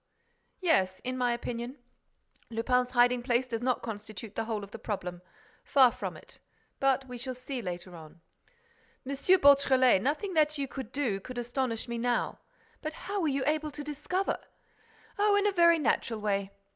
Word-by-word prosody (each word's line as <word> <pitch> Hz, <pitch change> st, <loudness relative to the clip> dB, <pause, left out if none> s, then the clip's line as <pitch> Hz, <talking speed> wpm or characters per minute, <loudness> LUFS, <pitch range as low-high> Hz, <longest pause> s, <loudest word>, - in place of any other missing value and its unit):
"Yes, 190 Hz, -, +2 dB
in 255 Hz, 0 st, -3 dB
my 250 Hz, -1 st, +1 dB
opinion, 240 Hz, +2 st, -4 dB, 0.7 s
Lupin's 250 Hz, +2 st, +1 dB
hiding 245 Hz, 0 st, +4 dB
place 245 Hz, 0 st, +1 dB
does 230 Hz, -2 st, -4 dB
not 255 Hz, -1 st, 0 dB
constitute 215 Hz, -1 st, -7 dB
the -, -, -2 dB
whole 220 Hz, -2 st, -3 dB
of 200 Hz, -, -10 dB
the -, -, -8 dB
problem. 180 Hz, -4 st, -4 dB, 0.4 s
Far 260 Hz, -3 st, +5 dB
from 195 Hz, -9 st, -5 dB
it. -, -, -14 dB, 0.4 s
But 270 Hz, 0 st, +2 dB
we 250 Hz, -1 st, -7 dB
shall 255 Hz, +1 st, -4 dB
see 255 Hz, 0 st, -5 dB
later 180 Hz, -2 st, -6 dB
on." 160 Hz, +1 st, -13 dB, 0.9 s
"M. 270 Hz, -, -4 dB, 0.3 s
Beautrelet, 265 Hz, -, +5 dB
nothing 310 Hz, -, -1 dB
that 305 Hz, -2 st, +3 dB
you 280 Hz, -, -1 dB
do 255 Hz, -4 st, -3 dB
could 250 Hz, +5 st, -9 dB
astonish 240 Hz, -1 st, -2 dB
me 235 Hz, 0 st, -3 dB
now. 240 Hz, 0 st, 0 dB, 0.4 s
But 310 Hz, 0 st, -4 dB
how 400 Hz, +4 st, -4 dB
were 325 Hz, -, +1 dB
you 275 Hz, -2 st, 0 dB
able 305 Hz, +1 st, 0 dB
to 295 Hz, 0 st, -7 dB
discover—?" 300 Hz, +6 st, -2 dB, 0.8 s
"Oh, 410 Hz, 0 st, +4 dB
in 405 Hz, 0 st, +3 dB
a 415 Hz, -, +4 dB
very 340 Hz, -3 st, +5 dB
natural 235 Hz, -5 st, 0 dB
way! 200 Hz, -2 st, -1 dB
250 Hz, 170 wpm, -30 LUFS, 225-285 Hz, 0.9 s, Far